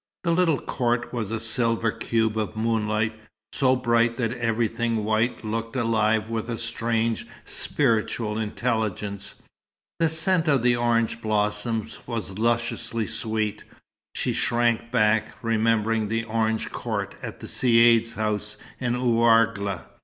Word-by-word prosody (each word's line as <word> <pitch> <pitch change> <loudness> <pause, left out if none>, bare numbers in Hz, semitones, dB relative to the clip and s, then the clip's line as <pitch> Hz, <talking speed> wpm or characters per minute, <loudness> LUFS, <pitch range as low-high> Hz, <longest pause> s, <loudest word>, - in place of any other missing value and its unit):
The 170 - +1
little 165 -4 +3
court 120 -1 -1
was 115 -5 -2
a 110 0 -2
silver 115 0 0
cube 110 -1 0
of 110 0 -2
moonlight, 110 -1 0 0.4
so 130 -1 +3
bright 120 -1 +2
that 115 -3 -1
everything 115 -1 0
white 110 +2 0
looked 115 +2 -3
alive 110 -2 +1
with 115 0 -3
a 115 - -2
strange, 115 0 -1 0.2
spiritual 110 -4 0
intelligence. 105 -3 -2 0.6
The 165 -1 +3
scent 165 +1 +3
of 140 -5 +3
the 125 -1 +4
orange 115 -1 +1
blossoms 105 +1 -1
was 105 -5 -4
lusciously 115 0 0
sweet. 110 -2 -2 0.5
She - - -1
shrank 120 -1 +1
back, 110 -2 +2
remembering 115 -1 +1
the 115 +2 -1
orange 110 -1 -1
court - - -3
at - - -7
the - - -8
Caïd's 115 -1 +4
house 105 0 -2 0.2
in 120 -2 0
Ouargla. 115 -6 +2
115 Hz, 130 wpm, -25 LUFS, 110-120 Hz, 0.6 s, the